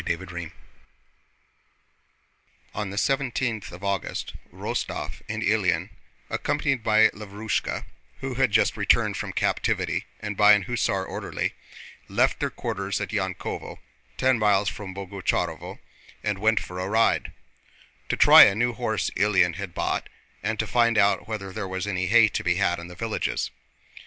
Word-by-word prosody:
CHAPTER 85 Hz, +2 st, -2 dB
XIII 85 Hz, -2 st, -6 dB, 2.2 s
On 105 Hz, -2 st, -3 dB
the 100 Hz, -, -7 dB
seventeenth 130 Hz, -4 st, -1 dB
of 90 Hz, +2 st, -11 dB
August 100 Hz, -1 st, -3 dB, 0.2 s
Rostóv -, -, -4 dB
and -, -, -3 dB
Ilyín, -, -, +1 dB, 0.4 s
accompanied 135 Hz, -5 st, -1 dB
by 110 Hz, 0 st, +5 dB
Lavrúshka 105 Hz, +1 st, -3 dB, 0.3 s
who 135 Hz, -1 st, -4 dB
had 130 Hz, 0 st, +2 dB
just -, -, +3 dB
returned -, -, +2 dB
from -, -, -4 dB
captivity -, -, -1 dB
and 105 Hz, -1 st, -4 dB
by 105 Hz, +1 st, +7 dB
an 105 Hz, -2 st, +3 dB
hussar 105 Hz, -6 st, -1 dB
orderly, -, -, -3 dB, 0.5 s
left -, -, +1 dB
their -, -, 0 dB
quarters 100 Hz, 0 st, -3 dB
at -, -, -3 dB
Yankóvo, 95 Hz, -3 st, -4 dB, 0.4 s
ten 130 Hz, -3 st, +3 dB
miles 100 Hz, -2 st, +3 dB
from 100 Hz, -2 st, -8 dB
Boguchárovo, 100 Hz, -1 st, -3 dB, 0.5 s
and 105 Hz, -2 st, -1 dB
went 110 Hz, +2 st, +3 dB
for 90 Hz, 0 st, -7 dB
a 95 Hz, -, -2 dB
ride—to 100 Hz, -, -2 dB
try -, -, +10 dB
a 100 Hz, -, +2 dB
new 120 Hz, +3 st, +1 dB
horse 110 Hz, -2 st, -1 dB
Ilyín 95 Hz, -4 st, +2 dB
had 100 Hz, -4 st, -6 dB
bought -, -, -2 dB, 0.3 s
and 110 Hz, +3 st, -2 dB
to 110 Hz, -, 0 dB
find 115 Hz, +1 st, +2 dB
out 100 Hz, 0 st, +3 dB
whether 100 Hz, -4 st, -5 dB
there 105 Hz, -2 st, -4 dB
was 95 Hz, 0 st, -3 dB
any 90 Hz, -3 st, -1 dB
hay 110 Hz, +2 st, +6 dB
to -, -, -3 dB
be 90 Hz, -1 st, +2 dB
had 90 Hz, -2 st, +1 dB
in 85 Hz, -, -8 dB
the 90 Hz, -, -11 dB
villages. 110 Hz, +3 st, -2 dB
105 Hz, 150 wpm, -25 LUFS, 95-110 Hz, 2.2 s, try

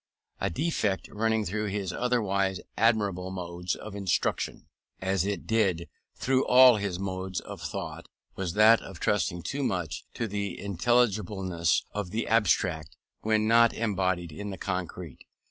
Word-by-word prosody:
A -, -, 0 dB
defect 105 Hz, -, -1 dB
running 110 Hz, 0 st, 0 dB
through 105 Hz, +3 st, -2 dB
his 100 Hz, -2 st, -3 dB
otherwise 100 Hz, -6 st, 0 dB, 0.2 s
admirable 100 Hz, -5 st, +1 dB
modes 90 Hz, -1 st, -4 dB
of 110 Hz, -, -9 dB
instruction, 100 Hz, -4 st, -1 dB, 0.3 s
as 95 Hz, 0 st, 0 dB
it 105 Hz, -, -3 dB
did 95 Hz, -7 st, +1 dB, 0.3 s
through 130 Hz, 0 st, +1 dB
all 125 Hz, -2 st, +8 dB
his 100 Hz, -3 st, -2 dB
modes 95 Hz, -1 st, -3 dB
of -, -, -9 dB
thought, -, -, -5 dB, 0.3 s
was 90 Hz, -3 st, -3 dB
that 110 Hz, +3 st, +6 dB
of 95 Hz, -4 st, -10 dB
trusting 90 Hz, -4 st, 0 dB
too 140 Hz, +1 st, -3 dB
much 90 Hz, -, -2 dB
to 115 Hz, -, -2 dB
the 100 Hz, -3 st, -3 dB
intelligibleness 100 Hz, -, +1 dB
of 105 Hz, -3 st, -4 dB
the 110 Hz, +4 st, -2 dB
abstract, 95 Hz, -8 st, +1 dB, 0.2 s
when 110 Hz, 0 st, +1 dB
not 115 Hz, +1 st, +5 dB
embodied 95 Hz, -6 st, -1 dB
in 105 Hz, +7 st, -6 dB
the 95 Hz, -, -6 dB
concrete. 90 Hz, -5 st, -5 dB
100 Hz, 145 wpm, -28 LUFS, 90-110 Hz, 0.3 s, all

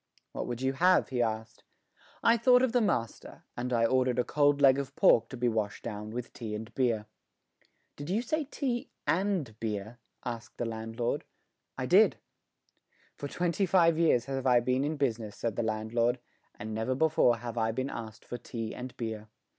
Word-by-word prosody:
"What -, -, -4 dB
would 120 Hz, +1 st, -4 dB
you 135 Hz, 0 st, +1 dB
have?" 180 Hz, +7 st, +3 dB
he 125 Hz, -2 st, 0 dB
asked. 110 Hz, -1 st, -3 dB, 0.6 s
I 230 Hz, -, +6 dB
thought 250 Hz, +2 st, +5 dB
of 260 Hz, -, +2 dB
the 245 Hz, 0 st, +3 dB
master, 115 Hz, -, -2 dB
and 125 Hz, +1 st, -3 dB
I 115 Hz, -1 st, +3 dB
ordered 130 Hz, 0 st, +2 dB
a 125 Hz, -, +3 dB
cold 145 Hz, 0 st, +2 dB
leg 135 Hz, -1 st, +6 dB
of 140 Hz, -2 st, -5 dB
pork 115 Hz, 0 st, +5 dB
to 130 Hz, -, -7 dB
be 120 Hz, +1 st, +1 dB
washed 110 Hz, -3 st, -2 dB
down 105 Hz, 0 st, -5 dB
with 120 Hz, +2 st, -6 dB
tea 110 Hz, -3 st, -5 dB
and 110 Hz, +2 st, -7 dB
beer. 115 Hz, -5 st, +1 dB, 0.9 s
"Did 145 Hz, +2 st, -7 dB
you 215 Hz, +6 st, 0 dB
say 310 Hz, +5 st, -1 dB
tea 255 Hz, -4 st, -3 dB, 0.2 s
and 185 Hz, -, 0 dB
beer?" 110 Hz, +2 st, -4 dB, 0.3 s
asked 120 Hz, -1 st, -6 dB
the 120 Hz, -, -2 dB
landlord. 115 Hz, +1 st, -3 dB, 0.5 s
"I -, -, -2 dB
did." -, -, +5 dB, 1.0 s
"For 145 Hz, -, -5 dB
twenty 175 Hz, +5 st, 0 dB
five 170 Hz, -3 st, +4 dB
years 140 Hz, -8 st, +3 dB
have 135 Hz, -1 st, -2 dB
I 125 Hz, -1 st, +6 dB
been 125 Hz, +2 st, 0 dB
in 150 Hz, +2 st, -2 dB
business," 115 Hz, -6 st, -1 dB
said 115 Hz, -3 st, -2 dB
the -, -, 0 dB
landlord, 115 Hz, +2 st, 0 dB, 0.4 s
"and 110 Hz, +1 st, -6 dB
never 110 Hz, +4 st, -1 dB
before 145 Hz, -5 st, +3 dB
have 120 Hz, 0 st, -5 dB
I 110 Hz, 0 st, +1 dB
been 130 Hz, +4 st, -3 dB
asked 110 Hz, -2 st, -8 dB
for 120 Hz, -, -6 dB
tea 115 Hz, -2 st, -5 dB
and 125 Hz, 0 st, -8 dB
beer." 110 Hz, -2 st, -5 dB
120 Hz, 185 wpm, -30 LUFS, 115-145 Hz, 1.0 s, I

